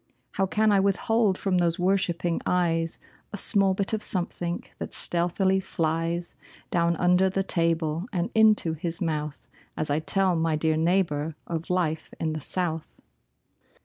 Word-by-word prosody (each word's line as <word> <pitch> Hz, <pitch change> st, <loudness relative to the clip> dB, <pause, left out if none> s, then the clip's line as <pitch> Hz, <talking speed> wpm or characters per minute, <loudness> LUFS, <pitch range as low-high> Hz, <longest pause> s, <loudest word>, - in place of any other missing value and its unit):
How 195 Hz, -, -1 dB
can 215 Hz, +2 st, +2 dB
I 200 Hz, -, +4 dB
withhold 200 Hz, +1 st, +1 dB
from 185 Hz, -2 st, 0 dB
those 170 Hz, -1 st, +1 dB
worshipping 180 Hz, -2 st, 0 dB
eyes 165 Hz, -2 st, 0 dB, 0.3 s
A 205 Hz, -, -5 dB
small 195 Hz, -1 st, +5 dB
bit 200 Hz, +2 st, -2 dB
of 215 Hz, -, -1 dB
something 175 Hz, -2 st, -1 dB, 0.2 s
that -, -, -6 dB
stealthily 180 Hz, +2 st, +3 dB
flies 165 Hz, -1 st, -2 dB, 0.4 s
Down 170 Hz, -1 st, +1 dB
under 180 Hz, +3 st, +3 dB
the 195 Hz, +1 st, -1 dB
table 165 Hz, 0 st, +1 dB
and 175 Hz, -4 st, -2 dB
into 215 Hz, -7 st, +3 dB
his 165 Hz, +1 st, -5 dB
mouth 150 Hz, -3 st, -4 dB, 0.3 s
As 155 Hz, -2 st, -2 dB
I 145 Hz, -, +1 dB
tell 190 Hz, +2 st, +1 dB
my 165 Hz, -1 st, 0 dB
dear 155 Hz, +1 st, +1 dB
neighbor 160 Hz, -2 st, 0 dB
of 165 Hz, +1 st, -5 dB
life 170 Hz, -4 st, -2 dB
in 160 Hz, -1 st, -2 dB
the 155 Hz, -, -5 dB
South. 165 Hz, -1 st, -4 dB
175 Hz, 150 wpm, -25 LUFS, 165-190 Hz, 0.4 s, small